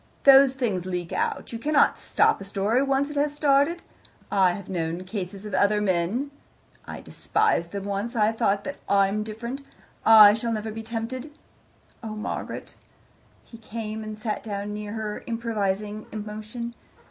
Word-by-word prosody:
"Those 270 -1 +8
things 205 -9 -1
leak 180 -2 -3
out; - - -2
you 230 - -4
cannot 290 +3 +3
stop - - +2
a - - -4
story 200 +5 +1
once 275 +1 +1
it - - -8
has 290 0 +1
started. 295 +3 +2 0.5
I 190 -3 +4
have 200 0 -8
known 170 -1 -3
cases 195 0 -6
of 210 - -7
other 205 +2 +3
men 205 +8 0 0.6
I - - -7
despised 420 - 0
them 200 -1 -4
once, 200 +4 -3
I 215 -1 +3
thought 200 -2 +1
that 285 - -5
I'M 200 +1 +3
different, 235 +5 -5 0.4
I 215 -2 +9
shall 230 +1 -2
never 220 0 -3
be 225 +1 -6
tempted. 235 +5 -5 0.7
Oh, 220 -2 -6
Margaret 210 - -5 0.4
" - - -33
He 230 - -11
came 220 -1 -5
and 215 0 -6
sat 215 0 -3
down 205 -1 -4
near 210 0 -5
her, 215 -1 -4
improvising 215 -3 -2
emotion. 215 +3 -6
215 Hz, 160 wpm, -25 LUFS, 200-235 Hz, 0.7 s, I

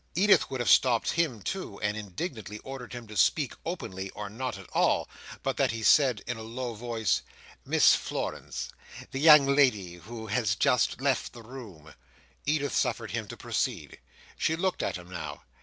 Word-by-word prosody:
Edith 200 +4 +4
would 130 - -4
have 120 - -2
stopped 120 -3 +4
him 145 - 0
too, 185 - -4
and 105 0 0
indignantly 105 - -5
ordered 135 -2 -8
him 120 -1 -7
to 105 0 -11
speak 90 - +2
openly 95 +1 -5
or 105 -1 -6
not 125 -1 -4
at 95 - -11
all, - - +2 0.4
but - - -1
that - - +3
he 115 0 -3
said, 130 0 +5
in 120 - -3
a - - -7
low 120 +2 -5
Voice—"Miss 115 -3 +1
Florence—the 135 - -5
young 150 -1 +8
lady 125 -11 +2
who 110 +6 -8
has 110 -2 +1
just 125 +4 +2
left 135 -2 0
the 120 - -11
room—" 105 - -11 0.5
Edith 145 -1 0
suffered - - 0
him - - -3
to - - -8
proceed. - - -3 0.4
She 160 - +2
looked 185 +2 -1
at - - -1
him 90 -1 -12
now. 90 -3 -7
120 Hz, 170 wpm, -28 LUFS, 105-135 Hz, 0.5 s, young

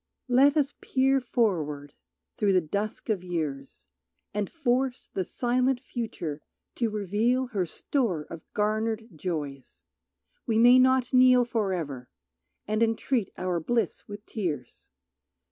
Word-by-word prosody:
Let 275 +4 +5
us 285 -1 +1
peer 270 +1 +2
forward 155 - -1 0.4
through 200 -2 +2
the 185 - +5
dusk 200 +6 -4
of 200 -5 0
years 140 - -4 0.5
And 205 -1 -1
force 260 -4 -1
the 190 - 0
silent 250 +5 0
future 215 - -5 0.4
to 235 -2 +1
reveal 215 +5 +1
Her 200 -8 -2
store 205 - -1
of 165 +1 -9
garnered 220 +2 0
joys; 145 -6 -5 0.6
we 225 -2 +2
may 245 +2 +7
not 260 0 +3
kneel 255 -1 +6
For 225 -5 -1
ever, 140 -8 -4 0.6
and 215 +1 0
entreat 225 -1 +1
our 180 -1 -1
bliss 230 +8 -1
with 205 +1 -9
tears. 160 - -5
215 Hz, 130 wpm, -27 LUFS, 175-245 Hz, 0.6 s, may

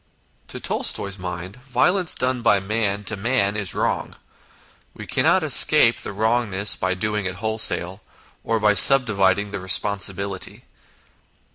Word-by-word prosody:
To - - -9
Tolstoy's 100 0 -2
mind, 90 +3 -7
violence 135 +8 0
done 125 -1 -1
by 105 -3 +2
man 105 0 -2
to 110 - -1
man 105 -1 -1
is 100 -3 -1
wrong. - - -3 0.8
We - - -10
cannot - - +1
escape - - +4
the - - -4
wrong 110 +3 -1
ness 100 +1 -1
by 95 0 -2
doing 105 0 -3
it 90 - -6
wholesale, 105 -3 -1 0.4
or 115 0 -1
by 105 -1 +2
subdividing 100 -4 +3
the 100 - -5
responsibility. 95 0 0
105 Hz, 135 wpm, -21 LUFS, 95-110 Hz, 0.8 s, escape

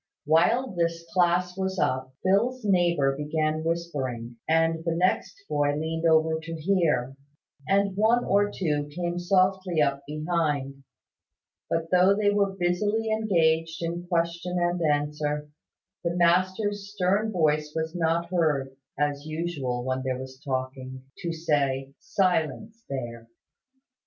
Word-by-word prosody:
While 210 - +3
this 170 -1 -1
class 180 0 +2
was 190 0 -2
up, 130 -3 0
Phil's 220 +6 +1
neighbour 170 -8 +2
began 155 +2 -1
whispering; 135 -9 -3
and 165 0 +2
the 165 -1 -1
next 185 +2 +1
boy 145 -1 +1
leaned 160 +2 -1
over 160 0 +3
to 165 +1 -6
hear; 160 -7 +1 0.5
and 200 0 +2
one 225 +4 +3
or 205 +1 +3
two 150 -7 -1
came 175 +3 -3
softly 185 -1 +2
up 140 -2 +2
behind: 150 -3 -2 0.9
but, 165 0 -1
though 185 +2 +5
they 205 0 +2
were 200 -1 +2
busily 205 +5 0
engaged 165 -6 +1
in 170 +1 -4
question 170 +1 -1
and 175 0 0
answer, 150 -1 0 0.6
the 170 0 -1
master's 185 +4 +1
stern 205 +2 +1
voice 155 -4 +1
was 160 0 -2
not 170 0 0
heard 145 -7 0 0.2
(as 145 0 -1
usual 155 -7 -3
when 130 0 -1
there 130 -1 -2
was 130 0 -9
talking) 130 -1 -4 0.2
to 175 -3 -3
say 140 -4 0
"Silence 205 - -1
there!" 120 -4 -5
165 Hz, 130 wpm, -26 LUFS, 150-185 Hz, 0.9 s, though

